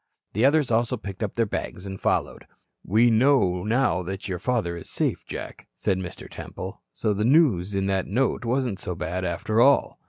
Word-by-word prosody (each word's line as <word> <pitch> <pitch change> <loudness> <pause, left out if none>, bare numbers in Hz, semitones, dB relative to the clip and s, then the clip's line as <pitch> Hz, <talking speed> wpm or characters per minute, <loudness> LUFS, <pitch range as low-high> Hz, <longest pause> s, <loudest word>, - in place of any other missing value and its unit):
The 110 +6 +2
others 145 -2 +3
also 115 +2 +1
picked 100 -2 -8
up 105 -3 -2
their 115 - +2
bags 100 -2 -5
and 95 -1 -7
followed. - - -1 0.4
"We 115 +5 +4
know 110 -7 +3
now 110 -4 +1
that 95 +3 -5
your 90 -3 -3
father 110 -8 -1
is 85 - -9
safe, - - -2
Jack," - - -7
said 95 +10 0
Mr. 90 -2 -7
Temple. - - -8
"So 105 - -1
the 105 +1 -1
news 115 - +3
in 95 0 0
that 95 -1 0
note 125 +6 0
wasn't 120 -4 -1
so 90 -2 -4
bad, 90 +2 -3
after 90 +6 0
all." 140 +3 +4
105 Hz, 190 wpm, -25 LUFS, 95-120 Hz, 0.4 s, We